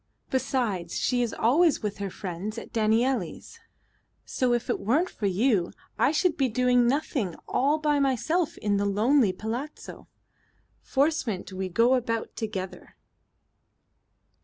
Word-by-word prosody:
Besides, 245 -10 -1
she 250 -1 +1
is 235 -2 0
always 295 +5 +3
with 210 -1 -3
her 200 -1 -3
friends 190 +4 -6
at - - -8
Danielli's, 230 - 0 0.7
so 255 -1 0
if 240 -1 0
it - - -1
weren't 300 - +1
for 205 - -2
you 195 -1 +1 0.3
I - - +4
should 345 +2 +1
be 270 -2 +2
doing 245 +1 +3
nothing 255 - -1
all 285 +4 +2
by 300 -2 +1
myself 285 +5 0
in 205 -1 0
the 200 - 0
lonely 215 +3 +3
palazzo. 230 +10 -6 0.7
Forcement 260 - -1
we 185 0 -3
go 230 +7 +3
about 230 -3 -1
together." 195 -5 -6
235 Hz, 135 wpm, -27 LUFS, 205-270 Hz, 0.7 s, I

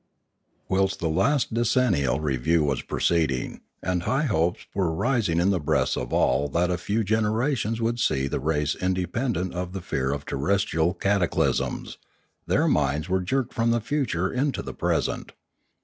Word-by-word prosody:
Whilst 95 0 +1
the 85 - -1
last 130 - +1
decennial 110 - +2
review 75 +2 +1
was 70 -3 0
proceeding, 80 -7 0 0.2
and 90 -1 0
high 135 - 0
hopes 90 - 0
were 95 -4 0
rising 100 -2 +1
in 90 +3 +3
the 95 - +1
breasts 75 - +1
of - - -4
all 70 +3 +2
that 85 +5 0
a 90 - 0
few 105 +5 0
generations 110 +2 0
would 115 +1 -1
see 70 - +1
the - - -2
race 75 0 0
independent 95 +2 -1
of 90 0 -4
the 95 - -4
fear 65 -5 -1
of 70 0 -4
terrestrial 85 +2 0
cataclysms, 100 -2 0 0.5
their - - +2
minds 75 +3 +1
were 95 0 +1
jerked 125 +7 -1
from 115 +1 +1
the 120 0 +2
future 110 - -1
into 135 +2 -1
the - - -6
present. - - -1
90 Hz, 160 wpm, -25 LUFS, 80-115 Hz, 0.5 s, in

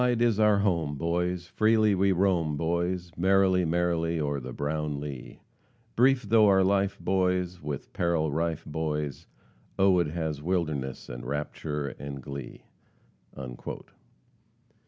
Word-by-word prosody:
"Wide 120 -1 +2
is 115 -3 +2
our 105 -1 +5
home, 85 -7 0
boys, 85 +3 -1
Freely 110 +2 +3
we 95 +1 +3
roam, 85 -5 +1
boys, 85 +2 -1
Merrily, 95 0 +3
merrily, 85 0 0
o'er 70 -2 -1
the 65 -1 -7
brown 75 +1 -2
lea; 70 -3 -8 0.5
Brief 130 +2 +4
though 110 0 +5
our 95 -1 +5
life, 100 +1 +1
boys, 90 0 0
With 75 -2 -6
peril 85 -3 +1
rife, 80 +1 -2
boys, 75 -2 -3 0.5
Oh! 95 -2 +4
it 85 - +1
has 80 -2 -3
wildness, 75 -6 -2
and - - -7
rapture, 75 +1 -3
and 70 -1 -6
glee." 70 -1 -8
85 Hz, 130 wpm, -28 LUFS, 75-95 Hz, 0.5 s, our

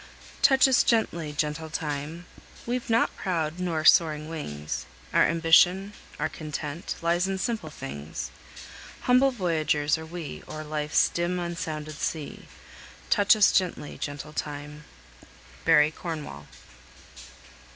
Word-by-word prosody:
"Touch 270 -1 +6
us 260 -2 +5
gently, 170 -9 +1
gentle 150 +2 -2
Time! 155 +2 -4 0.4
We've 245 0 -3
not 230 +1 +2
proud 165 -2 -2
nor 165 -4 -1
soaring 155 -2 +5
wings, 75 - -5 0.3
Our - - +5
ambition, 175 +4 +4 0.3
our 155 - +1
content, 155 0 -5
Lies 175 +2 +2
in 195 0 -1
simple 215 -4 -2
things; 80 - -7 0.7
Humble 255 +2 +4
voyagers 160 - 0
are 160 - -7
we 165 -2 -7
O'er 155 0 -6
life's 150 0 +1
dim 175 +1 -1
unsounded 155 -3 -4
sea; 155 -3 -4 0.6
Touch 205 +1 +5
us 210 -2 +5
gently, 180 -5 0
gentle 145 +1 -5
Time!" 150 0 -6 0.8
BARRY 150 -1 +5
CORNWALL. 155 - -7
160 Hz, 120 wpm, -27 LUFS, 150-180 Hz, 0.8 s, Touch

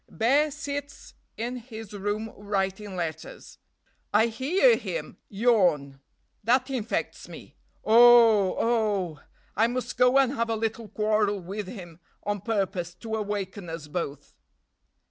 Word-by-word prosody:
Bear 275 +7 +2
sits 285 -1 -6 0.2
in 240 +3 -3
his 225 -3 -10
room 205 +2 -3
writing 200 -1 -3
letters. 160 -3 -6 0.5
I 215 +2 +4
hear 350 - +3
him - - -5
yawn; 180 - +2 0.4
that 255 +4 +2
infects 240 -4 -3
me. - - -12 0.3
Oh! 225 -4 +6
oh! 205 -9 0 0.4
I 225 +2 +3
must 250 +1 -4
go 250 +2 +5
and 270 -1 +3
have 230 -3 -1
a 225 - 0
little 225 0 -3
quarrel 210 -1 0
with 195 +3 -6
him 175 -6 -10 0.2
on 205 -1 -2
purpose 195 -5 -2
to 220 +4 -8
awaken 200 -3 -4
us 165 -2 -7
both. 145 -3 -5
215 Hz, 125 wpm, -26 LUFS, 190-240 Hz, 0.5 s, Oh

